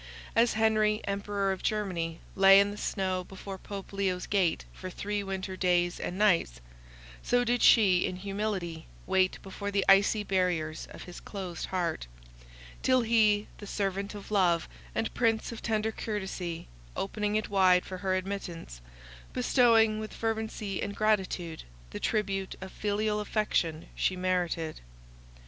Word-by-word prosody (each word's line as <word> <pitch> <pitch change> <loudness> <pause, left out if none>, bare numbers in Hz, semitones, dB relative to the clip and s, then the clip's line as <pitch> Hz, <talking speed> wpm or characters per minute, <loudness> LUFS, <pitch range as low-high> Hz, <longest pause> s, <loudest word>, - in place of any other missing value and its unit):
As 230 +1 +4
Henry, 215 -1 +2
Emperor 200 0 -1
of 190 - -4
Germany, 175 -6 -2
lay 195 0 +8
in 200 0 +3
the - - -6
snow 185 -3 -1
before 190 +1 -8
Pope 200 -1 -8
Leo's 190 -2 -1
gate 185 -5 +1
for 185 - -7
three 205 +3 -3
winter 190 -1 -4
days 175 -1 +1
and 180 - -4
nights, 175 - +2 0.6
so 245 0 +2
did 245 0 +1
she 190 -6 +6
in 185 - -4
humility 190 -4 -3 0.2
wait 185 0 +2
before 200 +1 -5
the 200 -1 +1
icy 200 +2 +5
barriers 180 -5 -1
of - - -10
his 180 - -9
closed 185 -5 -6
heart, 170 - -2 0.7
till 255 -1 +4
he, 215 -3 +3
the 205 - -8
servant 200 0 -2
of 205 0 -9
love, 175 -5 +3 0.3
and 225 - -1
prince 225 -2 +1
of 230 - -7
tender 220 -1 0
courtesy, 190 -6 -4 0.3
opened 210 +1 -1
it 215 - -3
wide 185 -2 +4
for 185 -1 -6
her 185 0 0
admittance, 180 - -5 0.5
bestowing, 230 -4 +4
with 215 0 -6
fervency 220 -3 -2
and 200 0 -3
gratitude, 190 -6 0 0.3
the - - -5
tribute 195 -2 -1
of 190 0 -8
filial 210 0 -1
affection 190 -6 0
she 185 - 0
merited. 180 -3 -1
195 Hz, 145 wpm, -29 LUFS, 185-210 Hz, 0.7 s, lay